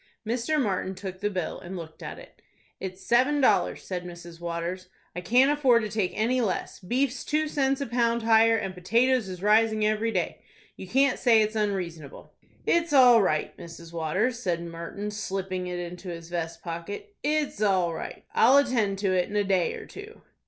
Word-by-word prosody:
Mr. 245 +7 0
Martin 190 -5 -1
took 190 -1 -7
the 205 +1 0
bill, 185 -5 -4
and 185 +2 -7
looked 160 -2 -10
at - - -7
it. - - -15 0.4
"It's 185 0 -7
seven 260 +5 +3
dollars," 210 -9 +2
said 180 -2 -4
Mrs. 175 -1 -10
Waters. 175 +2 -4 0.3
"I 180 - -4
can't 250 +9 +4
afford 260 -6 +3
to 215 - -3
take 210 -3 -1
any 245 +4 +1
less. 205 -6 -2
Beef's 250 +6 -1
two 310 +1 0
cents 275 -2 0
a - - -1
pound 235 -1 0
higher, 225 0 +5
and 195 -3 -3
potatoes 230 +5 +1
is 180 0 -8
rising 215 0 +3
every 215 +2 +1
day. 180 -5 -2 0.3
You 190 - -9
can't 270 +5 +2
say 230 -4 +5
it's 215 +1 -3
unreasonable." 180 -9 -4 0.3
"It's 335 -2 +1
all 250 -4 +7
right, 155 -6 0
Mrs. 170 0 -11
Waters," 185 +10 -1
said 175 -7 -2
Martin, 170 +5 -6
slipping 190 -3 -4
it 180 0 -4
into 175 +1 -7
his 165 -1 -8
vest 170 -1 -4
pocket. 180 - -6
"It's 295 -7 -1
all 185 -5 +2
right. - - -7
I'll 260 +5 +6
attend 235 -8 +2
to 195 -2 +1
it 180 -1 +1
in 205 - -6
a 205 - +3
day 190 -3 +1
or - - -9
two." 425 +2 -12
205 Hz, 190 wpm, -26 LUFS, 180-245 Hz, 0.4 s, all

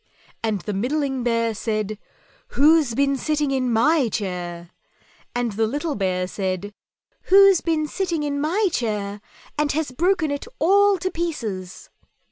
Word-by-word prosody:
and 215 -4 -1
the 210 - -4
middling 265 +5 -1
Bear 230 -1 0
said, 215 -1 -3 0.5
"WHO'S 295 -4 +4
BEEN 275 +1 +2
SITTING 300 0 0
IN 255 -2 0
MY 260 +3 +3
CHAIR?" 175 -4 -4 0.6
and 240 -1 0
the 220 +2 0
little 295 +6 -2
Bear 185 -4 -1
said, 190 +1 -4 0.6
"_Who's 390 -1 +7
been 320 -2 0
sitting 335 -2 -2
in 285 -1 -2
my 375 +8 +1
chair 210 -6 -2 0.4
and 300 -1 +2
has 305 -2 -2
broken 340 +2 +1
it 285 - -4
all 400 +4 +4
to 370 +1 -3
pieces? 225 - -5
265 Hz, 140 wpm, -22 LUFS, 210-315 Hz, 0.6 s, Who's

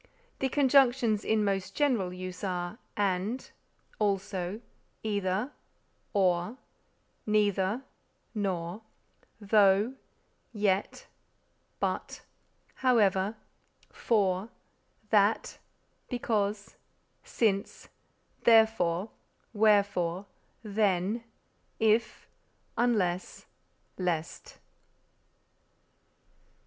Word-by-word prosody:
The 265 - 0
conjunctions 255 -6 +3
in 215 -1 +1
most 195 -2 -2
general 245 -11 +1
use 185 +1 -7
are 180 +2 -3 0.2
_and, 200 +4 -1 0.5
also; 200 -1 -1 0.4
either, 205 +3 -1 0.6
or; 185 +2 +1 0.7
neither, 210 +2 +1 0.5
nor; 190 -2 -3 0.6
though, 205 +2 +4 0.6
yet; 205 -2 0 0.7
but, - - -3 0.5
however; 210 -5 +2 0.6
for, 200 -2 +1 0.6
that; - - +2 0.5
because, 215 -5 -2 0.5
since; 200 -3 -1 0.6
therefore, 220 -5 +4 0.4
wherefore, 200 -4 +2 0.4
then; 205 +1 0 0.6
if, 220 0 +1 0.5
unless, 190 -7 0 0.5
lest_. 170 -3 -3
205 Hz, 60 wpm, -29 LUFS, 185-220 Hz, 0.7 s, though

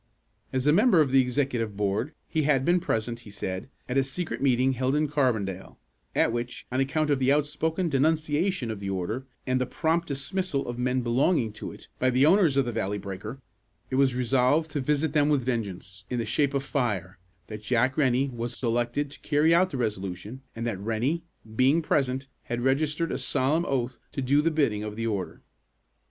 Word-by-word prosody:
As 130 0 -1
a 150 - +5
member 205 0 +5
of 145 -4 +3
the 135 0 +6
executive 125 -5 -1
board, 105 +8 -1
he 160 - 0
had 140 -3 +2
been 175 +1 +4
present, 115 -5 -2
he 120 - -13
said, 95 +1 -5 0.2
at 125 +2 +1
a - - +3
secret 155 +6 -4
meeting 130 -1 +3
held 130 +2 0
in 150 0 +2
Carbondale, 110 -10 -1 0.4
at - - +3
which, 120 +1 -4
on 130 - 0
account 150 +3 +1
of 140 - +2
the 130 +1 +3
outspoken 160 +4 0
denunciation 155 - +1
of 110 - -5
the 100 -1 -4
order, 105 +8 -3 0.2
and 130 0 +1
the 130 - 0
prompt 165 +4 0
dismissal 145 +2 -2
of 120 0 -5
men 125 +1 +1
belonging 120 - +1
to 110 - -7
it, - - -14
by 130 - +3
the 130 +2 +4
owners 165 -5 +4
of 135 - +3
the 120 - -2
Valley 100 -2 -2
Breaker, 105 +6 -7 0.5
it - - 0
was 135 -2 +3
resolved 130 +5 +2
to 145 - -1
visit 150 +2 0
them 150 -1 +3
with 140 -5 +2
vengeance, 95 -6 -4
in 125 - -2
the 115 - -1
shape 140 -2 +1
of 135 - 0
fire; 105 - -2 0.3
that 105 -1 -8
Jack 120 +4 +1
Rennie 135 -1 +2
was 120 -1 -5
selected 120 +4 -1
to - - -10
carry 155 +2 +3
out 185 +2 +4
the 140 - -4
resolution, 105 +1 -4
and 115 +1 -4
that 110 -5 -2
Rennie, 115 +10 0 0.3
being 135 +7 +3
present, 135 -2 0 0.2
had 120 0 -3
registered 150 +5 +1
a - - -2
solemn 150 +6 +1
oath 130 -2 -1
to 135 - -2
do 140 +3 +3
the 165 - +2
bidding 140 -10 +1
of 105 -1 -5
the 115 +1 -3
order. 100 -5 -3
130 Hz, 200 wpm, -27 LUFS, 115-150 Hz, 0.5 s, the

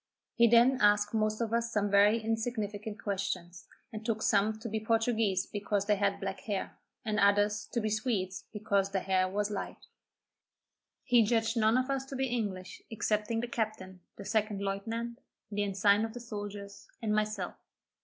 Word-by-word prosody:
He 235 0 +5
then 240 +3 +5
asked 205 0 +4
most 215 0 0
of 230 -1 -1
us 235 0 0
some 205 -2 0
very 205 +2 +5
insignificant 220 -2 -3
questions, 185 -3 -4 0.3
and 215 0 -6
took 220 -1 -1
some 215 +2 +2
to 220 - -7
be 220 0 -2
Portuguese 220 -3 +1
because 205 -1 -2
they 210 -1 +2
had 200 0 +1
black 195 -1 -4
hair, 200 -3 -4 0.3
and 215 -1 0
others 205 +1 +3
to 235 - 0
be 215 -1 -1
Swedes 210 -4 -1
because 200 -2 0
their 195 -1 -2
hair 185 -1 +2
was 205 +2 -1
light. 205 - -5 1.2
He 245 -3 +5
judged 225 +1 +1
none 220 +1 +3
of 255 +2 0
us 270 -1 -1
to 270 - -7
be 265 0 0
English 200 -6 -3
excepting 220 +1 -1
the 240 - -3
captain, 215 -5 -4 0.2
the 200 - -9
second 210 -1 0
lieutenant, 230 +5 -3 0.3
the 205 0 -1
ensign 200 +1 +3
of 225 -1 -3
the - - -5
soldiers, 205 -3 -7 0.2
and 215 -1 +1
myself. 215 -3 -1
210 Hz, 175 wpm, -31 LUFS, 200-225 Hz, 1.2 s, He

